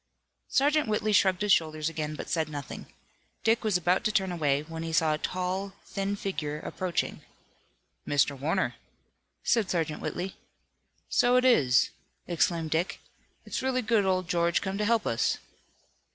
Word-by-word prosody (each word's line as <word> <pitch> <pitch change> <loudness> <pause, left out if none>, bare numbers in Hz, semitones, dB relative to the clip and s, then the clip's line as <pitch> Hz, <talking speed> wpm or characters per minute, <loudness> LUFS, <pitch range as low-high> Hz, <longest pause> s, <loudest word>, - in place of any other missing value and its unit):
Sergeant 295 +1 +2
Whitley 215 0 0
shrugged 190 -1 +3
his 205 -1 +5
shoulders 155 -1 +1
again, 155 -2 -3
but - - -6
said 160 -3 0
nothing. 145 -2 -7 0.6
Dick 225 +1 +3
was 210 -4 +2
about 180 +1 +1
to 215 - +3
turn 190 -3 +1
away, 145 -4 +1
when 165 +1 -7
he 165 0 -4
saw 160 -1 +3
a 150 - -2
tall, 185 +3 -2
thin 195 0 -2
figure 155 -7 -3
approaching. 185 -2 -2 0.9
"Mr. 145 0 +2
Warner," 135 -3 0 0.7
said 220 -6 +2
Sergeant 165 -4 -1
Whitley. 185 +2 -4 0.7
"So 245 +1 +3
it 250 0 +4
is," 135 - +4 0.4
exclaimed 165 -2 0
Dick. 165 +3 0 0.5
"It's - - -3
really 255 -1 0
good 220 -2 +3
old 185 -2 +1
George 170 +1 +2
come 195 +1 -3
to 210 - +1
help 230 0 +2
us!" 115 - +1
180 Hz, 155 wpm, -28 LUFS, 155-205 Hz, 0.9 s, his